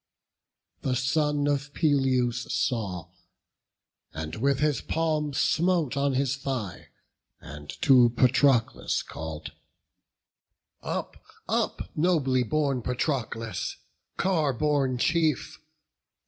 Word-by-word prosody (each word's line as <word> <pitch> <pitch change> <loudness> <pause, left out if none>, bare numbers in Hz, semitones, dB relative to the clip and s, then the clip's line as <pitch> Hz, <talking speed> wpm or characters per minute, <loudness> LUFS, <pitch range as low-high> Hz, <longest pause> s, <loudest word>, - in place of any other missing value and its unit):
The 130 - 0
son 145 +3 +1
of 145 0 -1
Peleus 130 -5 +1
saw, 100 -9 -1 1.1
and 80 0 -5
with 135 +4 +2
his 150 -2 +1
palm 155 -2 -1
Smote 155 +1 +1
on 140 0 +1
his 135 0 0
thigh, 130 -9 -4 0.5
and 75 +1 -11
to 125 -4 +7
Patroclus 125 0 +2
call'd: 80 -1 -7 1.3
"Up, - - -4 0.8
nobly 150 -6 +2
born 135 +2 0
Patroclus, 115 - -2 0.4
car 160 -7 +1
borne 140 -1 +1
chief! 160 +1 0
135 Hz, 90 wpm, -27 LUFS, 120-150 Hz, 1.3 s, to